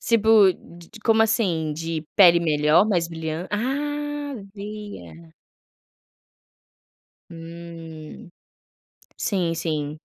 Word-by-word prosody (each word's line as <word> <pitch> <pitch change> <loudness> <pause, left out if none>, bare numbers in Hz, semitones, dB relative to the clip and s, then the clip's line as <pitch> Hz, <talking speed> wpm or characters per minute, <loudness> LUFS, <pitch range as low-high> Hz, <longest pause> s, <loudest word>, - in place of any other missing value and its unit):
Tipo 220 -4 +5
de 175 +6 -15
como 225 -1 +4
assim? 185 -9 0
De 165 0 -4
pele 175 -3 +7
melhor, 155 +3 +3
mais 175 -5 +1
brilhante 160 +1 -5
ah! 255 +7 -1 0.7
Vi, 210 0 -7
é. 80 0 -15 2.0
Hum. 165 -1 -10 0.9
Sim, 180 -5 -1
sim. 155 -2 -3
170 Hz, 90 wpm, -23 LUFS, 160-205 Hz, 2.0 s, pele